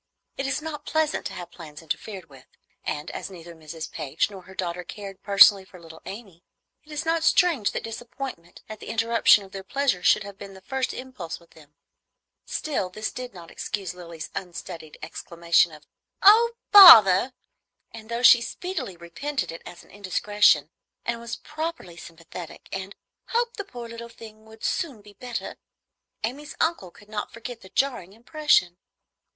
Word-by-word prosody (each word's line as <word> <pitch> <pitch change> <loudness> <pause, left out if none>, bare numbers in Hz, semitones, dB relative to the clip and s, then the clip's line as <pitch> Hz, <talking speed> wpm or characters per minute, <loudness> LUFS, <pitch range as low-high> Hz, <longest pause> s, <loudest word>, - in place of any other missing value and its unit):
It 270 - -3
is 275 +3 -2
not 315 -2 -6
pleasant 315 -1 0
to - - -9
have 175 -1 -8
plans 155 -2 -11
interfered 185 +3 -5
with; 135 -3 -17 0.4
and 150 +2 -4
as - - -6
neither 170 -2 -11
Mrs. 160 0 -8
Page 150 +8 -1
nor 195 -2 -9
her 190 - -14
daughter 180 -1 -3
cared 195 +1 -9
personally 200 -1 +7
for 185 -1 -15
little 165 -1 -13
Amy, 195 -5 -10 0.4
it 305 - -17
is 300 +1 -3
not 325 0 +1
strange 325 - +3
that - - -4
disappointment 225 -5 -8
at 215 -1 -9
the - - -11
interruption 230 -2 +4
of 190 - -14
their 195 - -6
pleasure 265 -3 0
should 210 - +4
have 200 0 -11
been 195 -1 -10
the 190 - -13
first 265 +4 -2
impulse 255 -10 -7
with 170 - -23
them. 150 -2 -19 0.7
Still, 270 -12 -2
this 215 +4 -4
did 250 -4 -8
not 170 -2 -11
excuse 195 -4 -4
Lilly's 170 -3 -9
unstudied 170 -3 -7
exclamation 170 +1 +1
of 150 -1 -14 0.4
"Oh, 455 +4 +7 0.2
bother!" 250 - +10 0.6
and 220 -1 -11
though 235 +1 -3
she 240 -1 +8
speedily 260 - -5
repented 220 - -4
it 165 - -9
as 175 - -11
an - - -21
indiscretion, 200 -5 +2 0.3
and 235 0 -2
was 235 0 -5
properly 310 - -6
sympathetic, 165 0 -11
and 190 +1 -5 0.3
"hoped 475 +1 -1
the 405 - -3
poor 245 -11 -9
little 230 0 -9
thing 220 -1 -13
would 220 0 -16
soon 280 - -2
be 205 0 -15
better," 245 +2 -6 0.7
Amy's 280 +7 -4
uncle 320 - 0
could 205 +4 -19
not 210 -1 -5
forget 230 0 -8
the 190 - -14
jarring 240 -9 -1
impression. 235 - +1
205 Hz, 170 wpm, -25 LUFS, 175-255 Hz, 0.7 s, bother